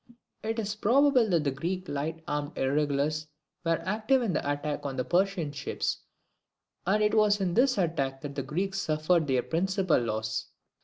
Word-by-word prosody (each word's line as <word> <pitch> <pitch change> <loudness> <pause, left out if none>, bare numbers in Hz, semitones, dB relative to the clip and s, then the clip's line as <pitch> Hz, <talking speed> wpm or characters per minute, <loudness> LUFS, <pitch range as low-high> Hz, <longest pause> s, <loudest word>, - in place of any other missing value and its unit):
[It 225 +1 -2
is 210 -2 -1
probable 250 +2 +4
that 170 -4 +2
the 140 - +1
Greek 180 +7 -3
light 160 +3 -3
armed 145 +1 -3
irregulars 145 +2 0 0.4
were 165 -1 +1
active 220 +7 +2
in 210 -6 0
the 145 - 0
attack 145 +1 -3
on 140 -2 -3
the 130 - -1
Persian 180 -4 +1
ships 140 -1 -3 0.9
and 210 +3 +3
it 210 - +2
was 210 -1 +4
in 185 -3 0
this 255 +3 +3
attack 140 -7 -1
that 145 -1 -6
the 140 - -2
Greeks 190 +7 -2
suffered 155 +1 +1
their 130 -2 +2
principal 190 0 +1
loss. 110 -1 -2
165 Hz, 170 wpm, -29 LUFS, 145-200 Hz, 0.9 s, probable